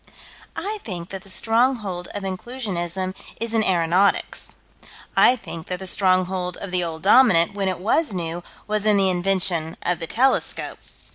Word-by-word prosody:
I 425 Hz, +2 st, -3 dB
think 175 Hz, -4 st, -6 dB
that 195 Hz, -1 st, -6 dB
the 195 Hz, -, -12 dB
stronghold 225 Hz, -4 st, +1 dB
of 205 Hz, -, -4 dB
Inclusionism 190 Hz, -3 st, -3 dB, 0.3 s
is 230 Hz, 0 st, -2 dB
in 225 Hz, -1 st, +3 dB
aeronautics. 180 Hz, +1 st, +1 dB, 0.6 s
I 250 Hz, -, +6 dB
think 170 Hz, -8 st, -9 dB
that 180 Hz, -, -3 dB
the 190 Hz, -, -8 dB
stronghold 185 Hz, -1 st, +1 dB
of 195 Hz, -, -7 dB
the 180 Hz, -1 st, 0 dB
Old 160 Hz, -2 st, -5 dB
Dominant, 200 Hz, -5 st, +5 dB
when 200 Hz, -1 st, -2 dB
it 185 Hz, -2 st, -1 dB
was 225 Hz, -, +1 dB
new, 175 Hz, -2 st, -3 dB, 0.2 s
was 215 Hz, 0 st, -1 dB
in 210 Hz, -1 st, +4 dB
the 190 Hz, -1 st, +4 dB
invention 180 Hz, -3 st, 0 dB
of 175 Hz, -1 st, 0 dB
the 165 Hz, -, -4 dB
telescope. 265 Hz, +8 st, 0 dB
190 Hz, 160 wpm, -22 LUFS, 175-215 Hz, 0.6 s, I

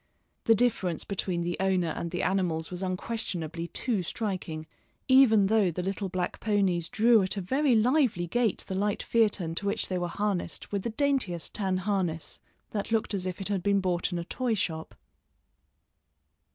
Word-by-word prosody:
The 225 Hz, -, +6 dB
difference 195 Hz, -8 st, +1 dB
between 185 Hz, -3 st, -2 dB
the 175 Hz, 0 st, -1 dB
owner 185 Hz, -3 st, +1 dB
and 170 Hz, +1 st, -3 dB
the 175 Hz, +1 st, -2 dB
animals 175 Hz, -4 st, 0 dB
was 180 Hz, 0 st, -4 dB
unquestionably 180 Hz, -4 st, -3 dB
too 225 Hz, +1 st, -1 dB
striking, 175 Hz, -4 st, -3 dB, 0.4 s
even 260 Hz, -6 st, +6 dB
though 210 Hz, -2 st, +3 dB
the 180 Hz, +2 st, -3 dB
little 195 Hz, +1 st, -2 dB
black 180 Hz, -1 st, -3 dB
ponies 195 Hz, -5 st, +1 dB
drew 230 Hz, -1 st, +5 dB
at 190 Hz, +2 st, -2 dB
a -, -, +1 dB
very 265 Hz, +7 st, +2 dB
lively 235 Hz, -, +3 dB
gait 225 Hz, +4 st, 0 dB
the -, -, -4 dB
light 200 Hz, +2 st, 0 dB
phaeton 205 Hz, -7 st, +1 dB
to 200 Hz, +4 st, -3 dB
which 200 Hz, -, +1 dB
they 185 Hz, -1 st, -1 dB
were 175 Hz, -, -1 dB
harnessed 195 Hz, -1 st, -2 dB
with 200 Hz, -1 st, -1 dB
the 235 Hz, -, -3 dB
daintiest 230 Hz, -, 0 dB
tan 190 Hz, -3 st, 0 dB
harness, 185 Hz, -4 st, -2 dB, 0.3 s
that 205 Hz, 0 st, -3 dB
looked 225 Hz, -1 st, +1 dB
as 185 Hz, -2 st, -2 dB
if 180 Hz, 0 st, -4 dB
it 195 Hz, -, -3 dB
had 200 Hz, -3 st, 0 dB
been 200 Hz, +1 st, +2 dB
bought 180 Hz, -1 st, 0 dB
in 175 Hz, -, -2 dB
a 170 Hz, -, -4 dB
toy 245 Hz, +3 st, -1 dB
shop. 160 Hz, -5 st, -3 dB
190 Hz, 180 wpm, -28 LUFS, 175-220 Hz, 0.4 s, The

